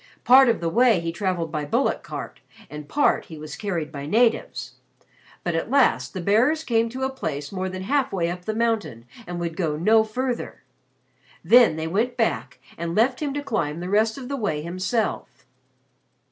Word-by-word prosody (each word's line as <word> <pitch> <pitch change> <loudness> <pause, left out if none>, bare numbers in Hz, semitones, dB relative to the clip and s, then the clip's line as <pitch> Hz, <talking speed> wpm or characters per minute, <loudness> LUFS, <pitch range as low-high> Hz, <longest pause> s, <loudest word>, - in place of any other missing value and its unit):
Part 260 +1 +7
of 230 - +1
the 170 - -1
way 230 0 +4
he 165 0 -3
traveled 175 -3 -2
by 150 -2 -2
bullock 145 - 0
cart, - - -7 0.3
and 150 -1 -8
part, 290 - +2
he 160 - -10
was 150 -1 -8
carried 170 -7 -3
by 140 -1 -6
natives. 230 +6 +1 0.7
But 175 - -1
at 165 +6 -2
last 235 - +2
the 185 - -3
bearers 245 - +2
came 230 -4 +1
to 260 +3 -5
a 265 - +1
place 145 - -5
more 190 -1 -3
than 185 0 -6
halfway 255 -7 0
up 180 0 -8
the 215 - -2
mountain, 220 - -1 0.2
and 175 0 -5
would 170 -1 -3
go 160 -5 -1
no 220 +8 +4
further. 245 +3 -4 0.8
Then 240 -9 +6
they 160 0 -3
went 215 +9 -1
back - - -1 0.2
and 170 0 -3
left 250 +4 +2
him 295 -2 -2
to 290 - -3
climb 165 - -2
the 180 +1 -5
rest 220 +3 +2
of 260 -2 -7
the 280 - -3
way 155 - -2
himself. 185 +6 -3
200 Hz, 190 wpm, -24 LUFS, 165-240 Hz, 0.8 s, Part